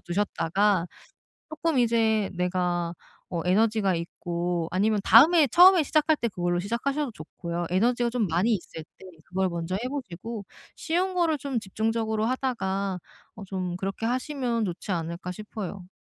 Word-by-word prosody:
두셨다가 195 0 0 0.6
쪼끔 315 -2 0
이제 225 -3 +2
내가 180 -1 -1 0.4
어 170 -2 -2
에너지가 205 0 +2
있고 170 0 -3
아니면 210 +3 +2
다음에 305 +6 +7
처음에 355 +5 +7
시작할 310 +2 +2
때 235 - -1
그걸로 175 -3 -1
시작하셔도 255 +8 -2
좋고요. 170 +2 -5
에너지가 235 +6 +2
좀 235 -4 0
많이 180 +8 +2
있을 170 -4 -5
때 - - -14 0.2
그걸 190 +1 0
먼저 170 +1 -3
해 230 +6 -2
보시고 225 -4 -6 0.3
쉬운 360 +3 -1
거를 335 -4 +1
좀 270 -3 -2
집중적으로 220 +2 -1
하다가 200 -7 -1 0.4
어 210 - -9
좀 185 -2 -4
그렇게 195 +4 -4
하시면 250 -2 -1
좋지 180 +2 -5
않을까 170 +1 -3
싶어요. 195 -2 -7
210 Hz, 330 characters per minute, -26 LUFS, 180-245 Hz, 0.6 s, 다음에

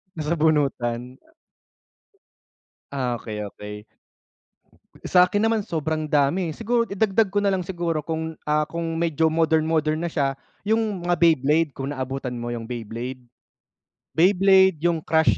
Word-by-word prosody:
Nasabunutan. 145 -6 0 1.7
Ah, 125 -3 -1
okey 105 -2 -6
okey. 105 +1 -9 1.2
Sa'kin 185 +4 +4
naman 225 -1 +2
sobrang 155 -4 -3
dami, 150 +5 +2
eh, - - -4
siguro 235 +1 +1
idagdag 200 +1 +2
ko 205 - -3
nalang 195 -2 +2
siguro 170 -3 -2
kung, 160 +1 -4 0.2
ah, 150 0 +2
kung 165 +1 -4
medyo 165 -1 +1
modern 160 0 +2
modern 155 0 +1
na 170 - -2
siya 140 -4 0 0.3
'yung 215 -4 0
mga 175 - +2
Beyblade 160 -1 +3
kung 135 +2 -3
naabutan 130 -1 -4
mo 120 0 -5
'yung 120 -1 -4
Beyblade. 120 +2 -6 1.0
Beyblade, 190 -1 +5
'yung 170 -1 +2
Crush 160 - +3
160 Hz, 130 wpm, -23 LUFS, 135-180 Hz, 1.7 s, Beyblade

